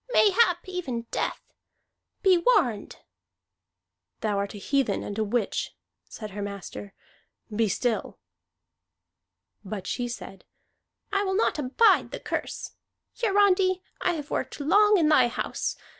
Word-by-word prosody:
Mayhap 385 -5 +4
even 330 -11 -3
death. - - -3 0.7
Be 380 -2 +6
warned!" 340 - +2 1.3
"Thou 205 -2 0
art 200 +1 -3
a - - -6
heathen 275 +5 0
and 205 - -5
a - - +2
witch," 215 0 -1 0.3
said 215 -2 -8
her 205 +1 -6
master. 200 0 -7 0.6
"Be 220 -1 +2
still!" 230 +4 -1 1.5
But 200 -1 -6
she 245 -1 -2
said: 235 -5 -8 0.7
"I 400 0 +1
will 380 -1 -1
not 405 -6 +1
abide 295 - +3
the - - -6
curse. - - -4 0.5
Hiarandi, 390 -3 +3 0.2
I 355 - +2
have 300 -3 -6
worked - - -3
long 410 +8 +5
in 325 -4 +3
thy 305 -5 +5
house. 235 - -3
285 Hz, 130 wpm, -26 LUFS, -, 1.5 s, Be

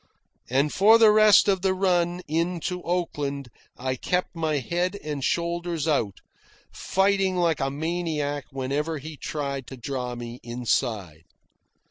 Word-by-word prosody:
And 140 +4 +1
for 215 +4 +6
the 225 -2 +7
rest 215 -1 +6
of 190 -2 +2
the 190 0 +1
run 180 -2 +1
in 170 +3 0
to 180 +2 -3
Oakland 145 -7 -2 0.3
I 130 +1 -2
kept 180 +8 -2
my 160 -2 0
head 175 - -1
and 150 -3 -4
shoulders 170 -1 -1
out, 115 -11 0 0.5
fighting 195 -1 +1
like 170 -3 +1
a 135 - 0
maniac 150 -2 -2
whenever 140 +4 -2
he 155 +2 -8
tried 140 -3 -4
to 130 - -9
draw 125 -1 -4
me 120 0 -7
inside. 115 - -2
155 Hz, 140 wpm, -25 LUFS, 135-180 Hz, 0.5 s, the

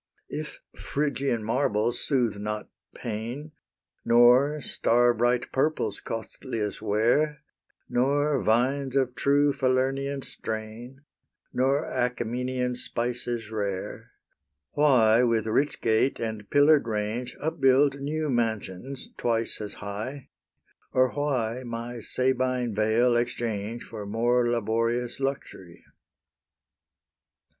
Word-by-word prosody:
If - - -6
Phrygian 140 -5 -1
marbles 115 -1 0
soothe 120 -7 0
not 105 +1 -4 0.3
pain, 120 +7 -5 0.5
Nor 125 +5 +5
star 120 -2 +2
bright 120 +1 +1
purple's 135 -7 0
costliest 115 -1 -5
wear, 145 +9 +1 0.4
Nor 140 +2 +1
vines 130 +4 +1
of 130 -2 +2
true 145 +2 +3
Falernian 135 +1 0
strain, 115 +5 -7 0.5
Nor 135 +4 +2
Achaemenian 125 +1 -1
spices 120 -2 -3
rare, 100 -3 -4 0.6
Why 125 -6 +5
with 115 -3 +2
rich 135 +6 0
gate 115 +4 +2
and 110 -3 -4
pillar'd 145 -2 +5
range 110 +3 -2
Upbuild 140 -2 +3
new 155 +3 -2
mansions, 115 0 -2
twice 115 -2 -1
as 105 - -6
high, 110 +7 -6 0.6
Or 130 -1 +3
why 130 -5 -1
my 120 0 -5
Sabine 125 0 0
vale 110 +4 +3
exchange 115 -2 -2
For 105 -3 -8
more 120 +3 +2
laborious 115 +2 0
luxury? 135 -10 -5
120 Hz, 100 wpm, -27 LUFS, 110-135 Hz, 0.6 s, Nor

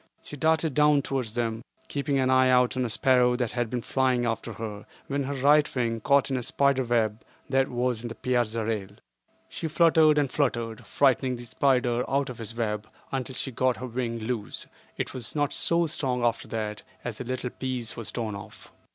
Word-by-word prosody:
She - - -8
darted 160 +1 +2
down 150 -1 +4
towards 125 -5 -3
them, 115 -2 -1 0.3
keeping 140 -1 -1
an 130 -1 +2
eye 130 0 +5
out 125 0 +4
on 130 - 0
a 120 - -1
sparrow 125 +1 +3
that 125 -3 -1
had 120 -2 -1
been 120 0 -3
flying 130 -2 +1
after 115 0 -2
her, 105 -1 -7 0.2
when 140 0 -2
her 140 +1 -3
right 145 +3 +4
wing 115 -2 0
caught 140 +3 +3
in 130 - +1
a - - -2
spider 140 +2 +2
web 115 -3 0 0.3
that 135 0 +3
was 125 -2 -1
in 120 - -5
the 115 - -7
piazza 115 -3 0
rail. 105 -4 -2 0.6
She 165 - -4
fluttered 160 -1 +5
and 140 -3 +1
fluttered, 120 -6 -1
frightening 130 -2 +2
the 120 0 -8
spider 125 -1 +2
out 140 0 +1
of 120 - -11
his 115 0 -5
web, 105 -3 -2 0.2
until 130 -1 -3
she 135 - -2
got 130 +1 +1
her 130 - -5
wing 120 -1 -3
loose; 110 -1 -3 0.3
but - - 0
it - - -11
was 125 +1 -3
not 145 -1 0
so 170 0 +2
strong 130 -5 0
after 115 - 0
that, 105 -2 -4 0.2
as 120 -1 -4
a - - -2
little 125 0 -3
piece 125 -4 -4
was 115 -2 -5
torn 115 -3 -3
off. 100 -1 -11
125 Hz, 205 wpm, -27 LUFS, 115-135 Hz, 0.6 s, eye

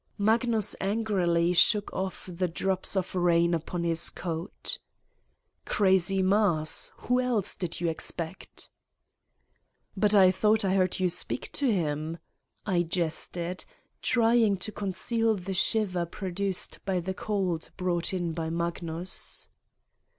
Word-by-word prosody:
Magnus 220 0 +2
angrily 190 -5 +1
shook 205 +3 +3
off 190 0 -4
the 180 0 -2
drops 190 +3 -1
of 185 -1 -1
rain 170 -1 +3
upon 170 +1 -2
his 165 -1 +3
coat. 170 +2 -4 0.9
"Crazy 190 -1 +3
Mars. 185 -6 +2
Who 250 +1 +1
else 240 -6 -1
did 175 -3 -4
you 175 - 0
expect?" 165 +1 -5 1.2
"But 210 +1 +3
I 190 -2 +7
thought 210 +3 +2
I 190 - +2
heard 185 -1 +1
you 185 - +3
speak 175 - -1
to 275 -4 +1
him?" 160 -3 -1 0.5
I 185 -4 +2
jested, 175 +1 -3 0.4
trying 230 -4 +3
to 200 +3 -4
conceal 220 +3 0
the 190 0 -5
shiver 185 -2 +1
produced 190 +1 -3
by 190 -2 0
the 185 +2 -3
cold 185 -5 -2
brought 180 -2 0
in 175 -3 -2
by 160 -1 -3
Magnus. 170 +1 -2
185 Hz, 125 wpm, -28 LUFS, 170-205 Hz, 1.2 s, I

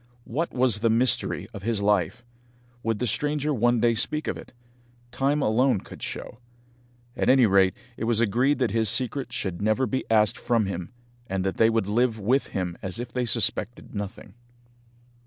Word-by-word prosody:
What 160 +8 -2
was 125 -4 +2
the 115 +1 +2
mystery 120 +3 +1
of 100 - -7
his 115 +1 -1
life? 100 +2 0 0.6
Would 115 -2 -1
the 125 - -1
stranger 150 +5 -1
one 120 -1 +2
day 115 +1 +3
speak 150 +7 0
of - - -1
it? - - -11 0.6
Time 140 +4 0
alone 115 -1 +2
could - - -12
show. 115 - -6 0.8
At - - 0
any 130 -1 +6
rate, 95 -1 +4 0.2
it - - -3
was 115 -1 +2
agreed 120 +6 +2
that 125 -4 0
his 110 -2 +2
secret 130 +4 -1
should 90 -2 -4
never 110 +5 +2
be 130 +2 -2
asked 110 -2 +3
from 120 -3 +1
him, 90 -1 -5 0.4
and 95 -2 -2
that 95 0 -2
they 115 - +5
would 115 -3 +1
live 115 +3 +1
with 120 +7 +1
him 90 -2 -4
as 95 +4 -4
if 120 0 -6
they 125 -1 0
suspected 115 0 0
nothing. 100 0 -6
115 Hz, 180 wpm, -25 LUFS, 105-125 Hz, 0.8 s, any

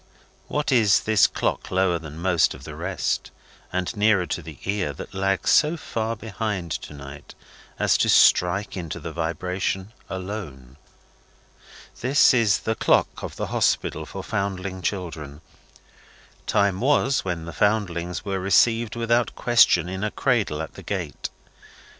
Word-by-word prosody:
What 150 -1 -1
is 110 -6 +4
this 110 -3 +4
clock - - -2
lower 95 -2 +1
than 75 -1 -9
most 85 -1 +2
of - - -13
the - - -8
rest, - - -2 0.4
and 90 +5 -2
nearer 105 -3 +3
to 90 - -3
the 80 -2 -10
ear, 100 -7 -1
that - - -9
lags 95 0 0
so 155 +2 +4
far 115 -6 -3
behind 105 -5 -4
to 75 - -5
night 70 +1 -11 0.4
as - - +2
to - - +2
strike 95 +3 +4
into 85 -5 -5
the 80 - -6
vibration 90 +5 -3 0.2
alone? 90 - -7 1.2
This 135 +3 +5
is 115 -5 +3
the 110 - -1
clock - - +1
of - - -6
the - - -3
Hospital 80 0 0
for 95 - -7
Foundling 95 -2 -3
Children. 80 -7 -4 1.1
Time 100 -2 +2
was, 135 0 +2
when 85 -3 -3
the 85 - -7
Foundlings 90 -4 0
were 95 -1 -2
received 115 +5 +3
without 120 +1 +1
question 115 -8 +4
in 95 +2 -4
a 105 - 0
cradle 105 - 0
at 80 - -9
the - - -11
gate. - - -4
95 Hz, 145 wpm, -24 LUFS, 85-110 Hz, 1.2 s, This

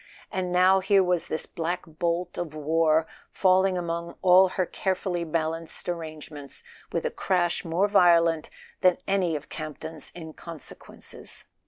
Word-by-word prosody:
And 185 -1 -2
now 185 +2 +5
here 195 +1 +4
was 180 -2 +1
this 155 - -2
black 175 +2 -3
bolt 170 +2 -2
of 160 -3 -4
war 160 +1 +2 0.2
falling 185 0 +3
among 170 -1 -3
all 185 +1 +7
her 185 0 -1
care¬ 190 +1 -1
fully 175 -3 -2
balanced 165 0 -2
arrangements 155 -4 -5 0.3
with - - -1
a - - 0
crash 175 -2 0
more 175 +4 +1
violent 170 -5 +4 0.3
than 185 -2 +5
any 185 -4 +1
of 150 - -6
Campton's 155 0 -6
inconsequences! 160 -1 -5
170 Hz, 140 wpm, -26 LUFS, 160-185 Hz, 0.3 s, all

